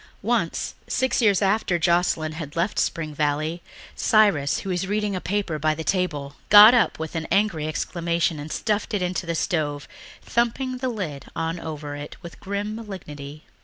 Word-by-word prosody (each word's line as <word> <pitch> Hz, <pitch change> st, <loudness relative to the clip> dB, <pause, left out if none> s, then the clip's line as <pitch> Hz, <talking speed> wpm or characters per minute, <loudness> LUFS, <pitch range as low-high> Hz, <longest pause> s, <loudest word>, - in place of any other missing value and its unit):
Once, -, -, 0 dB
six 260 Hz, -1 st, +1 dB
years 205 Hz, -3 st, +4 dB
after 195 Hz, -2 st, +2 dB
Joscelyn 170 Hz, -2 st, +1 dB
had 155 Hz, -2 st, -7 dB
left 170 Hz, +5 st, 0 dB
Spring 155 Hz, -3 st, -1 dB
Valley, 150 Hz, +3 st, -1 dB, 0.3 s
Cyrus, 200 Hz, -11 st, +3 dB
who 195 Hz, -, -6 dB
was 180 Hz, +1 st, -1 dB
reading 205 Hz, 0 st, -1 dB
a 185 Hz, -, -3 dB
paper 190 Hz, -5 st, -2 dB
by 155 Hz, +1 st, +1 dB
the 160 Hz, -, -5 dB
table, 150 Hz, -7 st, -1 dB
got 210 Hz, +3 st, +10 dB
up 240 Hz, -, +3 dB
with 160 Hz, 0 st, -5 dB
an 160 Hz, -1 st, -3 dB
angry 195 Hz, -7 st, +1 dB
exclamation 170 Hz, 0 st, -1 dB
and 150 Hz, +2 st, -7 dB
stuffed 210 Hz, -1 st, -1 dB
it 190 Hz, -, 0 dB
into 180 Hz, 0 st, -2 dB
the 170 Hz, -, -1 dB
stove, 150 Hz, -4 st, -1 dB, 0.4 s
thumping 255 Hz, +2 st, 0 dB
the 255 Hz, 0 st, -2 dB
lid 165 Hz, -, -5 dB
on 165 Hz, +1 st, -2 dB
over 150 Hz, -3 st, -6 dB
it 145 Hz, 0 st, -8 dB
with 170 Hz, -, -10 dB
grim 200 Hz, +2 st, -3 dB
malignity. 155 Hz, -9 st, -8 dB
170 Hz, 170 wpm, -24 LUFS, 155-205 Hz, 0.4 s, got